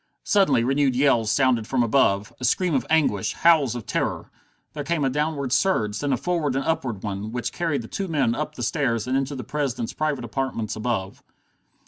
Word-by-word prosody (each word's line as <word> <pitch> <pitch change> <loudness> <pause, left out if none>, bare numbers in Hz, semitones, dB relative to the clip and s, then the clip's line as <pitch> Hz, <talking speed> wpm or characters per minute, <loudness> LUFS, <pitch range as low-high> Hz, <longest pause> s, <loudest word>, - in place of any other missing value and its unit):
Suddenly 145 - +3
renewed 135 +1 +2
yells 125 -5 +3
sounded 120 -2 +2
from 130 -2 +1
above, 105 -4 +2
a - - -9
scream 170 +7 +1
of 135 - 0
anguish, 150 -11 +2
howls 155 -8 +4
of 120 -4 -6
terror. - - -2 0.4
There 150 - -4
came 155 -1 0
a 135 - +1
downward 145 -2 -1
surge, 105 - +1
then 145 -1 -1
a 130 - +2
forward 165 -6 -1
and 135 0 -1
upward 125 -11 -2
one, 105 +1 -4
which 125 0 -3
carried 160 -8 -1
the - - -9
two 195 - -4
men 145 -8 +1
up 150 +3 -4
the 120 - -5
stairs 115 -4 0
and 130 +1 -1
into 135 +1 -1
the 130 - -5
President's 130 -3 -3
private 150 -5 -2
apartments 115 -3 -3
above. 110 -4 -3
135 Hz, 195 wpm, -24 LUFS, 115-150 Hz, 0.4 s, howls